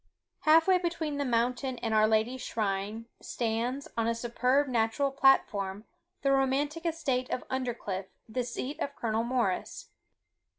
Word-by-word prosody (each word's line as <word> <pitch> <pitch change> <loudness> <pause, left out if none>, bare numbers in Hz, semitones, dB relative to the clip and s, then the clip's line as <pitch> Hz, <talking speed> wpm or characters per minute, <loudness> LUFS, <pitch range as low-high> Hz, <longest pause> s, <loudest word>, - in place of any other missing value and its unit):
Half 320 +1 +5
way 370 -1 +5
between 335 -4 -2
the 285 - 0
mountain 250 +2 0
and 225 -2 -2
our 215 0 +5
Lady's 220 +4 +1
shrine, 210 +1 -2 0.2
stands, 240 +4 -2
on 230 -1 0
a 230 - +1
superb 250 +4 +1
natural 245 +3 +1
platform, 210 -7 +2 0.4
the 275 - +3
romantic 285 +5 +1
estate 265 -6 -1
of 250 - -3
Undercliff, 235 -7 -3 0.2
the 245 +3 -2
seat 255 +4 -5
of 280 0 -3
Colonel 225 -1 -1
Morris. 235 -6 -2
250 Hz, 140 wpm, -30 LUFS, 225-275 Hz, 0.4 s, Half